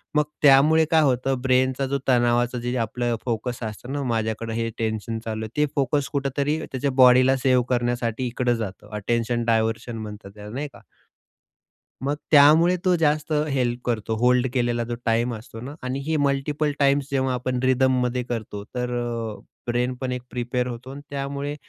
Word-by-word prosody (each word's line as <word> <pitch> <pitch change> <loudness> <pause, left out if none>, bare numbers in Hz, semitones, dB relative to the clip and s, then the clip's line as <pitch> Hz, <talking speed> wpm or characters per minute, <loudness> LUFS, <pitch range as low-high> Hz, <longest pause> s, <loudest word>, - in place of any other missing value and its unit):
मग 150 - +4 0.2
त्यामुळे 150 +3 +6
काय 160 - +5
होतं, 130 -2 +1
ब्रेनचा 130 +1 +2
जो, 140 +1 -1
तणावाचं 120 -1 +2
जे 125 +1 -2
आपलं 120 +1 -2
फोकस 120 +1 -3
असतं 110 +4 -6
ना, 145 -1 -2
माझ्याकडं 110 0 -2
हे 115 0 -1
टेन्शन 110 0 -2
चालू 110 -1 -3
आहे, 110 - -12
ते 150 - +4
फोकस 140 +1 0
कुठेतरी 140 +2 0
त्याच्या 135 +1 -2
बॉडीला 130 +1 +6
सेव्ह 130 -2 +4
करण्यासाठी 120 0 0
इकडं 120 0 0
जातं. 105 -2 -6
अटेन्शन 115 +3 -1
डायव्हर्शन 115 +1 0
म्हणतात 105 -2 -8
त्याला, 105 0 -9
नाही 145 +2 -3
का? - - -15 1.2
मग 145 - 0 0.2
त्यामुळे 155 +5 +7
तो 180 - +4
जास्त 155 -1 +1 0.2
हेल्प 125 -3 0
करतो. 115 -2 -1
होल्ड 125 +1 +3
केलेला 120 -2 0
जो 120 +1 -4
टाईम 115 +1 +1
असतो 110 +1 -10
ना 140 +4 -7
आणि 130 +2 -2
ही 160 -1 +1
मल्टीपल 145 +1 0
टाइम्स 140 0 +2
जेव्हा 130 -1 +1
आपण 125 0 -2
रिदममध्ये 130 -1 +2
करतो, 110 -4 -5
तर 125 0 -2 0.5
अ, - - -15 0.3
ब्रेन 125 +1 0
पण 130 -1 -2
एक 125 - -3
प्रिपेर 125 0 -2
होतो. 125 +2 -7
अन 140 - -8
त्यामुळे 140 +1 -4
125 Hz, 170 wpm, -24 LUFS, 120-140 Hz, 1.2 s, त्यामुळे